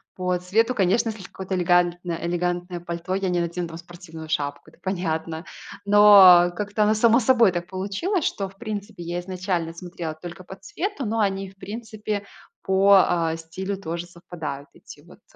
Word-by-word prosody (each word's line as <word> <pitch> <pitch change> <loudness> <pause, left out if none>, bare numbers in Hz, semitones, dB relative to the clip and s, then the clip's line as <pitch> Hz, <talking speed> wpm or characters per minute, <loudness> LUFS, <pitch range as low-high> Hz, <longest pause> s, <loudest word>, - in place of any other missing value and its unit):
по 180 -1 -1
цвету, 225 +7 +1
конечно. 200 +4 +2
Если 215 -3 -7
какое-то 190 0 -5
элегантно 175 -1 +1
элегантное 175 +1 -2
пальто, 170 +2 -4
я 195 -1 -1
не 175 -1 +1
надену 170 0 -3
там 165 - -8
спортивную 165 -2 -11
шапку, 145 -2 -3
это - - -25
понятно. 165 -3 -3 0.4
Но 200 -4 +8
как-то 210 +2 -1
оно 210 +1 +3
само 230 +2 +4
собой 235 -4 +4
так 175 -1 -3
получилось 200 - -2
что, 195 - -2
в 190 - -19
принципе, 210 -3 -6
я 175 +1 -3
изначально 180 -2 -3
смотрела 170 -2 -6
только 175 +3 -10
по 190 - -10
цвету, 310 - -5
но 225 +1 -1
они, 195 -2 0
в 195 - -19
принципе, 215 0 -5 0.4
по, 190 -4 +4
э, - - -4
стилю 190 +5 -5
тоже 170 0 -4
совпадают, 165 -5 -8
эти - - -14
вот, - - -18
185 Hz, 170 wpm, -24 LUFS, 170-205 Hz, 0.4 s, Но